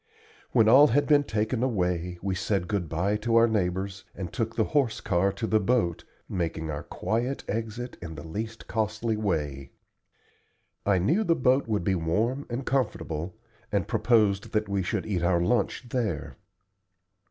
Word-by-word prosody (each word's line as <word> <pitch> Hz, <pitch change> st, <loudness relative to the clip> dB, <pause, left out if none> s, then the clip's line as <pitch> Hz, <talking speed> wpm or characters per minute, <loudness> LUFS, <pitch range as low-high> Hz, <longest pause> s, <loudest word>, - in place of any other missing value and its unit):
When 115 Hz, -4 st, +4 dB
all 135 Hz, +6 st, +8 dB
had 145 Hz, +5 st, +2 dB
been 145 Hz, -1 st, +5 dB
taken 110 Hz, +2 st, -1 dB
away, 90 Hz, -7 st, -1 dB
we 95 Hz, -1 st, 0 dB
said 95 Hz, -1 st, -1 dB
good 100 Hz, -6 st, -2 dB
by 95 Hz, +6 st, 0 dB
to 115 Hz, +2 st, 0 dB
our 115 Hz, 0 st, +6 dB
neighbors 95 Hz, -2 st, -1 dB
and 90 Hz, -3 st, -6 dB
took 115 Hz, +4 st, -2 dB
the 110 Hz, -, +2 dB
horse 135 Hz, -3 st, +1 dB
car 95 Hz, 0 st, +1 dB
to 115 Hz, -, -3 dB
the 110 Hz, 0 st, +3 dB
boat, 105 Hz, -5 st, 0 dB, 0.2 s
making 80 Hz, -3 st, -2 dB
our 75 Hz, -, -4 dB
quiet 120 Hz, +5 st, -2 dB
exit 115 Hz, +3 st, -4 dB
in 80 Hz, -2 st, -7 dB
the 70 Hz, -, -8 dB
least 110 Hz, +6 st, -5 dB
costly 110 Hz, +1 st, -1 dB
way. 75 Hz, -10 st, -2 dB, 1.1 s
I 100 Hz, -2 st, +4 dB
knew 155 Hz, -, +2 dB
the 170 Hz, -5 st, +3 dB
boat 130 Hz, 0 st, +2 dB
would 105 Hz, -5 st, 0 dB
be 95 Hz, -, +1 dB
warm 105 Hz, +11 st, 0 dB
and 125 Hz, +2 st, -3 dB
comfortable, 95 Hz, -, -2 dB, 0.4 s
and -, -, 0 dB
proposed 105 Hz, -5 st, +2 dB
that 110 Hz, 0 st, +1 dB
we 100 Hz, -1 st, 0 dB
should 90 Hz, -, -2 dB
eat 95 Hz, -5 st, -1 dB
our 85 Hz, 0 st, +2 dB
lunch 120 Hz, +6 st, 0 dB
there. 105 Hz, -, -2 dB
105 Hz, 165 wpm, -27 LUFS, 90-115 Hz, 1.1 s, all